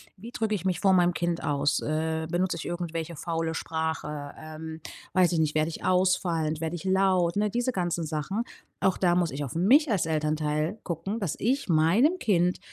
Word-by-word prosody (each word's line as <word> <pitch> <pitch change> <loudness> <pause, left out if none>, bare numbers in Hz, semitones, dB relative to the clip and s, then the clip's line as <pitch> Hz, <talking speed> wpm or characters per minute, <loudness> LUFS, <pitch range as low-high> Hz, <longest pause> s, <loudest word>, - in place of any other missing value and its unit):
Wie 220 +5 -10
drücke 220 -2 -1
ich 195 -5 -2
mich 185 -2 0
vor 195 -2 +4
meinem 175 -1 +3
Kind 170 -1 -1
aus? 145 0 +1
Äh, 160 +1 -1
benutze 175 0 0
ich 155 - -6
irgendwelche 170 -1 -4
faule 165 +1 -2
Sprache? 160 -3 -3
Ähm, 160 0 -8 0.3
weiß 185 -2 +4
ich 170 - +1
nicht. 155 -1 +1
Werde 155 +1 +2
ich 165 - -8
ausfallend, 175 -4 +1
werde 165 +1 -2
ich 175 - -7
laut, 190 -2 +2
ne, 210 +1 +1
diese 245 +4 0
ganzen 175 -5 -1
Sachen. 160 +8 -2 0.4
Auch 190 - +2
da 175 -2 +3
muss 175 -2 +2
ich 145 +2 -4
auf 135 - -5
mich 250 - +4
als 190 -6 +1
Elternteil 155 +3 -1
gucken, 185 +6 -3
dass 195 -8 -2
ich 260 +1 0
meinem 185 - +4
Kind, 180 - +1
170 Hz, 195 wpm, -27 LUFS, 160-190 Hz, 0.4 s, vor